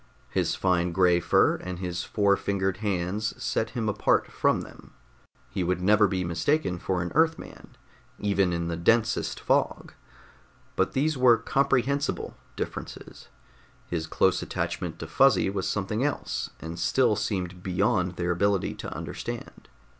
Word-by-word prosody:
His - - 0
fine 90 -2 +1
gray 90 -1 +4
fur 85 - +3
and 90 -1 -6
his 90 -1 -3
four 100 -2 +2
fingered 95 -2 -1
hands 100 0 -2
set 110 - -1
him 115 -2 -1
apart 105 - +1
from - - +1
them - - -13 0.5
he 90 - -3
would 90 +1 0
never 105 +3 +4
be 95 -1 -1
mistaken 90 - 0
for 90 -1 -1
an 85 - -5
Earthman, 160 0 -1 0.4
even 100 -3 +1
in 85 -1 -2
the 85 - -2
densest 110 +6 +1
fog. - - 0 0.8
But - - +1
these 145 +1 0
were 125 -2 +6
comprehensible 140 +3 0 0.2
differences. - - -7 0.6
His 80 -2 -2
close - - +2
attachment - - -3
to - - -6
Fuzzy 95 - +3
was 95 -2 -2
something 105 +4 -1
else, 145 0 -2
and 85 +1 -7
still 115 +5 +3
seemed 95 -4 -3
beyond 90 -1 0
their 90 0 -1
ability 100 +2 +1
to - - -6
understand. - - -7
95 Hz, 145 wpm, -27 LUFS, 90-110 Hz, 0.8 s, were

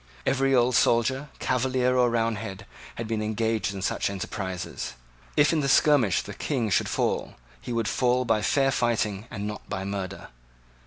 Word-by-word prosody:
Every 135 0 +2
old 125 0 +3
soldier, 130 +6 +2
Cavalier 125 0 +1
or 125 -1 +4
Roundhead, 110 -4 -2 0.3
had 115 - -5
been 110 -1 -1
engaged 110 0 0
in 95 -2 -6
such - - 0
enterprises. 95 - -5 0.4
If 150 +2 +5
in 160 - +2
the 140 -2 0
skirmish 135 - +4
the - - -8
King 120 -8 -2
should - - +2
fall, - - -1 0.3
he - - -6
would 115 -2 0
fall 125 +3 +1
by 110 -3 +2
fair 135 +5 +2
fighting 115 -4 0
and 105 -3 -5
not 105 0 -6
by 95 -2 -3
murder. 100 -2 -5
115 Hz, 165 wpm, -26 LUFS, 105-125 Hz, 0.4 s, If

